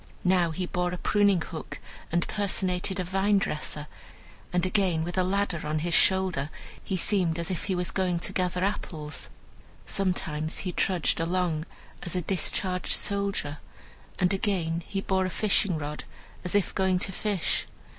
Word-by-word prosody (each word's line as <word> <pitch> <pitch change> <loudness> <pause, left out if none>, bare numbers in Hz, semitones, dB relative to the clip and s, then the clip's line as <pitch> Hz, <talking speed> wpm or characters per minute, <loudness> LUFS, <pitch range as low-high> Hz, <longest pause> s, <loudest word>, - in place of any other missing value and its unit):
Now 180 -2 +4
he 180 +3 -2
bore 180 0 -1
a - - -2
pruning 200 -2 +3
hook, 155 -4 -7 0.3
and 170 +1 +1
personated 190 -2 0
a - - +1
vine 195 +3 +2
dresser; 150 -4 -2 0.7
and 180 0 +2
again, 185 -4 +2
with 175 +2 -4
a 185 - +3
ladder 190 -3 0
on 155 +1 0
his 170 +3 -1
shoulder, 185 -8 +4 0.3
he 190 - -1
seemed 175 -3 +2
as 170 +3 -2
if 180 - -2
he 190 - 0
was 180 -1 -1
going 185 -2 +1
to - - -3
gather 180 0 0
apples. 160 -6 -3 0.6
Sometimes 160 -5 -1
he 180 - 0
trudged 180 -1 +1
along 165 -2 0 0.3
as 175 - -3
a 180 - +1
discharged 180 +1 0
soldier, 200 -7 0 0.6
and 180 +1 +3
again 185 -5 0
he 195 - -2
bore 190 -1 +1
a - - -1
fishing 200 -3 +2
rod, 150 0 -5 0.4
as 180 - 0
if 205 - +2
going 190 -1 +2
to 190 - -2
fish. 200 -1 -1
180 Hz, 165 wpm, -28 LUFS, 170-190 Hz, 0.7 s, Now